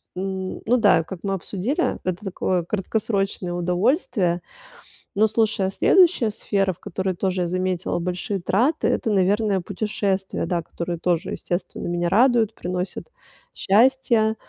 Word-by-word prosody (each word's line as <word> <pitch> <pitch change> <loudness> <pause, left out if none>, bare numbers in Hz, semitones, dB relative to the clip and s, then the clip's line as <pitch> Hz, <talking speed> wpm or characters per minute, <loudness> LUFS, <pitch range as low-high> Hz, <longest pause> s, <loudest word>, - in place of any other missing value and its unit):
н 190 0 -4
ну 245 +3 +3
да, 205 -7 +5
и - - -1
как 180 +2 -8
мы 195 -1 -1
обсудили, 205 - -1
это 185 +3 -3
такое 185 -1 -1
краткосрочное 195 -1 -2
удовольствие. 180 - +1 0.7
Но, 215 +2 +4
слушай, 220 -2 +1
а - - 0
следующая 345 - +4
сфера, 195 -2 0
в - - -24
которой 190 +2 -3
тоже 185 0 -1
я 175 - 0
заметила 185 0 -1
большие 180 +3 -3
траты- 240 - +1
это, 225 - 0
наверное, 200 +1 +2
путешествия, 195 0 -2
да, 175 -2 -1
которые 170 +1 -5
тоже, 175 +1 -1
естественно, 175 +1 -4
меня 175 0 0
радуют, 230 +1 +3
приносят 180 - -4 0.4
счастье. 230 0 +3
195 Hz, 140 wpm, -23 LUFS, 180-220 Hz, 0.7 s, да